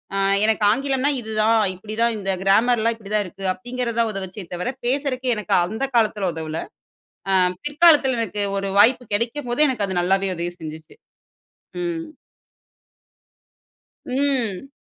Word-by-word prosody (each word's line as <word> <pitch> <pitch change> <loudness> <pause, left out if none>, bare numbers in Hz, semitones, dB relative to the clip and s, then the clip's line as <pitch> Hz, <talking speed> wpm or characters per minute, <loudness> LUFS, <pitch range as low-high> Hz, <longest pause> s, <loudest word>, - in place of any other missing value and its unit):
"அ - - 0 0.3
எனக்கு 220 -1 +1
ஆங்கிலம்னா 270 +3 0
இதுதான் 220 0 +2 0.2
இப்பிடி 215 +4 -8
தான் 235 -1 +3
இந்த 195 -1 -4
கிராமர்லாம் 230 +3 +3
இப்பிடி 210 -2 -10
தான் 210 - +2
இருக்கு" 195 +1 -9
அப்டீங்குறதான் 235 -1 -2
உதவுச்சே 190 -1 -6
தவிர 180 +8 -2
பேசுறக்கு 260 -1 0
எனக்கு 210 -4 -3
அந்த 220 +9 -4
காலத்துல 210 -4 +2
உதவல. 160 0 -4 0.7
அ - - +3 0.3
பிற்காலத்துல 295 -4 +4
எனக்கு 210 -1 -3 0.2
ஒரு 195 0 -2
வாய்ப்பு 245 +4 +5
கெடைக்கும்போதே 240 +5 0
எனக்கு 215 -6 -1
அது 185 -2 -1
நல்லாவே 190 +1 +1
உதவி 175 +1 -2
செஞ்சுச்சு. 155 0 -9 0.9
ம். 330 -1 -3 2.0
ம். 260 -4 -1
225 Hz, 130 wpm, -22 LUFS, 195-255 Hz, 2.0 s, வாய்ப்பு